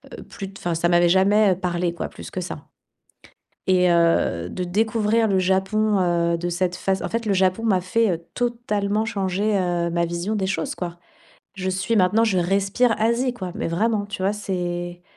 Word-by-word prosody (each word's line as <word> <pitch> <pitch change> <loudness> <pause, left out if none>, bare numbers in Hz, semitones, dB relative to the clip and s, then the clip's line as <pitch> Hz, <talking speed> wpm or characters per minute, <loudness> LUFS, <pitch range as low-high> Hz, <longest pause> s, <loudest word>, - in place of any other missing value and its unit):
heu - - -10
plu 195 -1 -9
enfin, 175 -1 -2
ça 170 +1 +1
m'avait 175 0 +4
jamais 195 +2 +4
parlé 175 -1 -2
quoi, - - -4
plus - - -10
que 185 - -4
ça. 180 - -7 1.0
Et 180 -1 +4
heu, 165 - +2
de 180 - -4
découvrir 220 +3 +1
le 195 - +2
Japon, 190 +3 +1
heu, 170 -1 +1
de 175 +1 -3
cette 180 +1 -1
phase 190 +1 -1
en - - -2
fait, 230 0 -2
le 200 - +2
Japon 185 +3 +2
m'a 190 -5 +2
fait, 215 +3 +1
heu, 170 0 -5
totalement 220 -4 -1
changer, 205 -1 -1
heu, 175 -2 0
ma 170 0 0
vision 170 +5 -3
des 195 -2 -1
choses 190 -4 -2
quoi. 175 -1 -6 0.6
Je 190 -1 -2
suis 190 +5 -1
maintenant 205 +4 +3
je 210 -5 +1
respire 195 +6 +2
Asie 235 +3 +1
quoi, 185 -7 -6
mais 225 - -2
vraiment 205 +5 0
tu 205 -2 -6
vois? 195 - +2
C'est 175 -3 -4
190 Hz, 190 wpm, -23 LUFS, 175-210 Hz, 1.0 s, m'avait